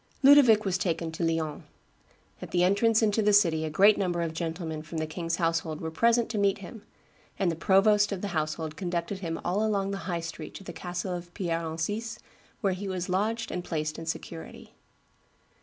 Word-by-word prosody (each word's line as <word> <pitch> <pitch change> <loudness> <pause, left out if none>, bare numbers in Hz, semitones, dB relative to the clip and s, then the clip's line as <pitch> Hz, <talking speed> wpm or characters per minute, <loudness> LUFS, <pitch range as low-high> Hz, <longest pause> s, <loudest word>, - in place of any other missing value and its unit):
Ludovic 260 -6 +7
was 185 -2 0
taken 165 -3 -1
to 160 - -4
Lyons. 160 -2 -1 0.8
"At - - -7
the 175 0 +2
entrance 215 +4 +3
into 215 0 +2
the 210 0 +3
city 170 -6 +4
a - - -2
great 200 +7 +5
number 175 -3 0
of 165 -1 -3
gentlemen 160 -1 -4
from 155 +1 -7
the 155 - -1
king's 165 +1 -3
household 165 -2 -1
were 160 - -4
present 235 +7 +3
to 215 - -1
meet 200 -1 +2
him; 200 +3 -10 0.6
and 190 -4 +1
the - - -3
provost 205 +4 +4
of 195 -2 -3
the 205 - -3
household 155 -2 -2
conducted 175 +1 -3
him 165 -3 -4
all 200 +4 +1
along 200 -2 0
the 200 - -3
high 170 -1 -1
street 165 -2 -7
to - - -8
the 175 - -8
castle 180 +1 -4
of 175 0 -6
Pierre 170 -3 -1
Encise, 185 +8 -3 0.4
where 195 -4 +2
he 195 +2 -5
was 185 -1 -3
lodged 220 +5 -1
and 180 - -3
placed 155 -2 -3
in 165 - -8
security." 165 0 -7
180 Hz, 200 wpm, -28 LUFS, 165-200 Hz, 0.8 s, Ludovic